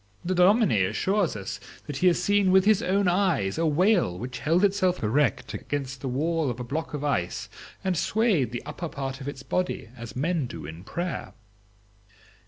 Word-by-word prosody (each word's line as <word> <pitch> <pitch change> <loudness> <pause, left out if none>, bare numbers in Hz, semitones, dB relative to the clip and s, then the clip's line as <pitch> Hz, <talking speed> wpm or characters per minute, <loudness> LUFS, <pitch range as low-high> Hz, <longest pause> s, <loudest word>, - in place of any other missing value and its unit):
The 185 - 0
dominie 180 - +4
assures 190 - 0
us 100 0 -5 0.3
that 145 -2 -5
he 185 - +3
has 175 - +4
seen 200 +1 +3
with 190 +1 +5
his 215 0 +4
own 195 -1 +1
eyes 175 - +1
a 165 - +2
whale 175 - +3
which 125 +5 -6
held 165 +9 +3
itself 185 - +1
erect 130 +5 +1
against 135 -2 -4
the 135 - -3
wall 155 +3 0
of 120 0 -4
a - - -3
block 150 +5 -4
of 145 - -4
ice, 140 -12 -1 0.3
and 185 -1 0
swayed 190 - +1
the 120 - -5
upper 170 -2 -5
part 135 -1 -5
of 135 - -6
its 135 -2 -6
body 180 -5 -2
as 115 -2 -9
men 155 +1 0
do 80 -9 -8
in 80 +4 -9
prayer." 175 - -4
155 Hz, 190 wpm, -26 LUFS, 130-185 Hz, 0.3 s, with